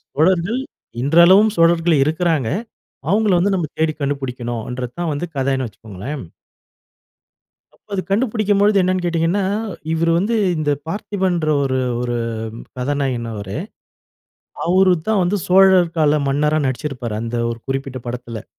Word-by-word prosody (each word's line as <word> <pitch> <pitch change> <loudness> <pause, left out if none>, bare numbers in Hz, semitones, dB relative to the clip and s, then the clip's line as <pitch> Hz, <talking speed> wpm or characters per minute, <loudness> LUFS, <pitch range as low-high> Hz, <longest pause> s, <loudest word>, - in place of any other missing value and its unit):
சோழர்கள் 180 - +2 0.4
இன்றளவும் 170 - +6
சோழர்கள் 165 -1 +4
இருக்குறாங்க. 160 -5 0 0.6
அவுங்கள 210 -1 +3
வந்து 195 +3 +2
நம்ப 175 -4 0
தேடி 160 0 +2
கண்டுபுடிக்கனும்ன்றது 125 -3 -4
தான் 170 -2 -1
வந்து 145 +5 -3
கதைன்னு 135 -1 0
வச்சுக்கோங்களேன். 110 +5 -8 1.5
அப்ப - - -31
அது 185 - -1
கண்டுபுடிக்கும்பொழுது 210 -2 +2
என்னன்னு 185 0 0
கேட்டீங்கன்னா, 170 +3 +1 0.5
இவரு 165 +1 +1
வந்து 215 +6 0 0.2
இந்த 150 -1 0 0.2
பார்த்திபன்ன்ற 185 -3 -1
ஒரு 130 -1 0 0.2
ஒரு 120 -1 -2 0.6
கதாநாயகன் 125 -3 -1
அவரு. 100 +1 -6 1.1
அவரு 185 +1 +4
தான் 215 -4 +2
வந்து 195 +4 0
சோழர் 185 -2 +5
கால 150 -1 +3
மன்னரா 150 +3 +1
நடிச்சுருப்பாரு. 130 -4 -4
அந்த 115 +1 -3
ஒரு 115 - -7
குறிப்பிட்ட 135 -1 -3
படத்தில. 120 -2 -6
155 Hz, 120 wpm, -19 LUFS, 130-185 Hz, 1.5 s, இன்றளவும்